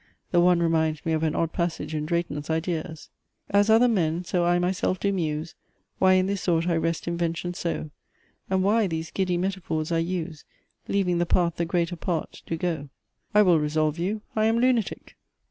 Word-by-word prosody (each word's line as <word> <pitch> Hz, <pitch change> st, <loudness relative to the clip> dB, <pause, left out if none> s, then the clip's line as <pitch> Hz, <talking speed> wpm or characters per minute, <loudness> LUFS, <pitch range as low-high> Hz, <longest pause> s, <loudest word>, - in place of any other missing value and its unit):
The 175 Hz, -, +4 dB
one 175 Hz, 0 st, +4 dB
reminds 160 Hz, -2 st, +1 dB
me 165 Hz, -, 0 dB
of 155 Hz, -, 0 dB
an 160 Hz, -1 st, 0 dB
odd 165 Hz, -1 st, 0 dB
passage 165 Hz, -3 st, -2 dB
in 155 Hz, 0 st, -2 dB
Drayton's 160 Hz, -3 st, -2 dB
IDEAS 160 Hz, -1 st, -3 dB, 0.4 s
As 200 Hz, +1 st, +4 dB
other 225 Hz, +3 st, +6 dB
men, 175 Hz, -6 st, +1 dB
so 175 Hz, 0 st, 0 dB
I 175 Hz, 0 st, +3 dB
myself 180 Hz, +1 st, 0 dB
do 200 Hz, +2 st, 0 dB
muse, 160 Hz, -3 st, -2 dB, 0.5 s
Why 185 Hz, 0 st, +5 dB
in 185 Hz, 0 st, +3 dB
this 195 Hz, -1 st, -2 dB
sort 170 Hz, -1 st, +1 dB
I 170 Hz, -, +2 dB
wrest 165 Hz, 0 st, -1 dB
invention 170 Hz, +1 st, -2 dB
so; 165 Hz, -3 st, -3 dB, 0.6 s
And 190 Hz, 0 st, +1 dB
why 210 Hz, +2 st, +3 dB
these 160 Hz, -2 st, -4 dB
giddy 185 Hz, -2 st, 0 dB
metaphors 175 Hz, -4 st, -2 dB
I 165 Hz, -, +2 dB
use, 170 Hz, -2 st, -3 dB, 0.4 s
Leaving 180 Hz, -3 st, +1 dB
the 175 Hz, -, +1 dB
path 170 Hz, -1 st, +2 dB
the 170 Hz, -, 0 dB
greater 170 Hz, 0 st, 0 dB
part 165 Hz, -2 st, -3 dB
do 165 Hz, -, -2 dB
go; 160 Hz, -4 st, -3 dB, 0.5 s
I 210 Hz, -, +7 dB
will 175 Hz, -5 st, +4 dB
resolve 155 Hz, +1 st, 0 dB
you: 205 Hz, +5 st, -2 dB
I 215 Hz, 0 st, +2 dB
am 225 Hz, +1 st, +3 dB
lunatic! 245 Hz, -3 st, 0 dB
170 Hz, 190 wpm, -25 LUFS, 160-185 Hz, 0.6 s, I